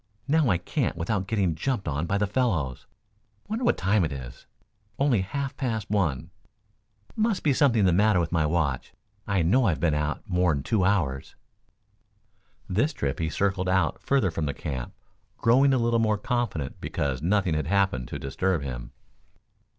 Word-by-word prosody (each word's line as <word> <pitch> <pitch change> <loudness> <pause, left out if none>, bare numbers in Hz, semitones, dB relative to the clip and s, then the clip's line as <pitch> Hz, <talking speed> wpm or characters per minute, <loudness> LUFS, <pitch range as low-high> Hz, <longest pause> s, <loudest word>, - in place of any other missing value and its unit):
Now 155 -2 +3
I 90 - +3
can't - - -2
without 95 +3 -1
getting 100 -6 +1
jumped 100 - -2
on 75 +3 -1
by 100 - +1
the 105 - +1
fellows. 95 - -1 0.6
Wonder 225 +4 -3
what 240 - +2
time 95 +1 +2
it 80 - -1
is 60 -3 -8 0.5
only 135 -7 +2
half 135 +8 -4
past 110 -7 -3
one. 85 -11 0 0.8
Must 220 -2 0
be 145 - +3
something 120 -8 +3
the 90 - +4
matter 105 +1 +4
with 85 -2 -1
my 80 -3 +2
watch. 75 -5 -1 0.3
I 100 -4 +1
know 120 +10 +3
I've 85 -4 0
been 85 -3 +2
out 75 +7 -2
more'n 90 -7 +1
two 105 +2 +1
hours." 80 -9 0 1.3
This 115 - +1
trip 70 - -2
he 80 -1 -1
circled 95 +1 0
out 95 0 +1
further 135 -10 +1
from 80 -2 -2
the 70 - -3
camp, 65 -5 -5 0.4
growing 130 +4 +4
a 130 - +3
little 115 -1 +2
more 110 -2 +2
confident 105 - -3
because 65 -3 -2
nothing 95 0 +1
had 75 0 -1
happened 95 -10 +1
to - - -5
disturb 80 +4 -1
him. - - -6
95 Hz, 170 wpm, -26 LUFS, 80-115 Hz, 1.3 s, the